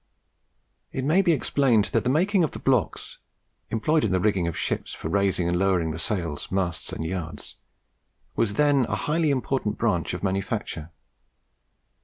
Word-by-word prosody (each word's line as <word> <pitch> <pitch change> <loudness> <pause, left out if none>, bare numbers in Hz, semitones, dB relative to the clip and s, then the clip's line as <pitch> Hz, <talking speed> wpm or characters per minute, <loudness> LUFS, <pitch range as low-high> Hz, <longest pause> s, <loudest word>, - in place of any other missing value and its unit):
It 130 - -3
may 165 +7 +4
be 180 -3 +3
explained 130 -7 +2
that - - +2
the 125 - 0
making 180 +7 +3
of 155 - +1
the - - -5
blocks 125 -9 0 0.5
employed 150 +8 +1
in 105 - +1
the 95 - +2
rigging 95 -3 +1
of 85 - -3
ships - - -2
for 80 - -5
raising 95 -2 +1
and 90 0 +1
lowering 90 -4 +2
the 80 - -4
sails, 85 -8 -2
masts, 95 -3 -2
and 80 - -4
yards, 85 -1 -5 0.8
was 105 -3 0
then 145 -3 +3
a - - 0
highly 155 +1 +1
important 130 -5 -1
branch 95 -7 0
of 90 - -7
manufacture. 95 -4 -2
105 Hz, 165 wpm, -25 LUFS, 90-135 Hz, 0.8 s, may